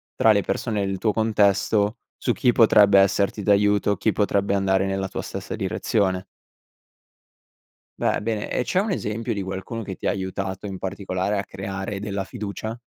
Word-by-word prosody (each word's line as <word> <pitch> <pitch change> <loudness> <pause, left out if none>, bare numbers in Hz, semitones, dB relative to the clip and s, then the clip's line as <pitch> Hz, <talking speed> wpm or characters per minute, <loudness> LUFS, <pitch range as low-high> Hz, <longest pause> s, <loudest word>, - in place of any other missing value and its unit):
tra 110 - +5
le 100 - +3
persone 105 0 -2
del 95 - -2
tuo 105 +2 0
contesto, 105 0 +2 0.2
su - - 0
chi 125 - +3
potrebbe 105 -4 +6
esserti 100 +1 +2
d'aiuto, 105 0 +3
chi 105 +4 +1
potrebbe 100 -1 +1
andare 95 0 +2
nella 95 0 -1
tua - - -5
stessa - - -6
direzione. 95 -3 0 1.7
Beh, - - +1
bene, 110 -1 -3
e - - 0
c'è 185 +8 +1
un 210 +1 -2
esempio 115 - -2
di 100 - -3
qualcuno, 95 +4 -5
che 95 -3 -6
ti - - -10
ha - - +3
aiutato 95 0 -3
in 95 -2 -5
particolare 95 +1 -2
a 100 - -3
creare 95 +1 -5
della 100 -2 -3
fiducia? 110 0 -5
100 Hz, 165 wpm, -23 LUFS, 95-105 Hz, 1.7 s, potrebbe